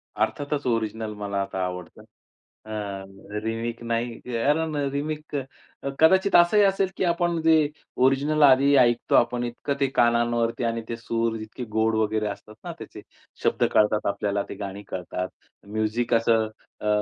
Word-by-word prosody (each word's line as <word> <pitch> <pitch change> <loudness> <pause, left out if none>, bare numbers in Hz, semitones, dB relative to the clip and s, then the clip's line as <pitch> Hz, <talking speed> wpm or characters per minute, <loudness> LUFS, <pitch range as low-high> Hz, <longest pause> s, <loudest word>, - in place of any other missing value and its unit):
अर्थातच, 145 0 -1
ओरिजिनल 110 -2 -1
मला 100 -1 -2
आता 95 -1 -3
आवडतं, 90 -1 -7 0.6
अ, 110 - -9 0.7
रिमेक 115 +1 -3
नाही, 115 0 -2
कारण 145 +7 0 0.2
रिमेक 150 +2 -4 0.5
अ, - - 0
कदाचित 190 +5 +5
असं 175 +4 +6
ही 205 - +7
असेल, 195 -1 +2
की - - 0
आपण 170 -1 +1
जे 160 -2 +4 0.4
ओरिजिनल 145 +3 +2
आधी 140 +1 +6
ऐकतो, 120 -1 +3
आपण 120 0 +3
इतकं 120 +4 -3
ते 140 - +3
कानांवरती, 120 0 +2
आणि 115 0 -1
ते 115 - -2
सूर, 115 0 -1
इतके 110 +4 -7
गोड 110 0 +2
वगैरे 110 0 0
असतात 105 +1 -8
ना, - - -5
त्याचे - - -9 0.4
शब्द - - +2
कळतात 105 0 +3
आपल्याला, 100 0 -1
ते - - -6
गाणी 100 0 -6
कळतात, 90 0 -4 0.4
म्युझिक 110 +3 -1
असं, 115 -1 +3 0.3
अ, 105 - -3
115 Hz, 150 wpm, -25 LUFS, 110-145 Hz, 0.7 s, ही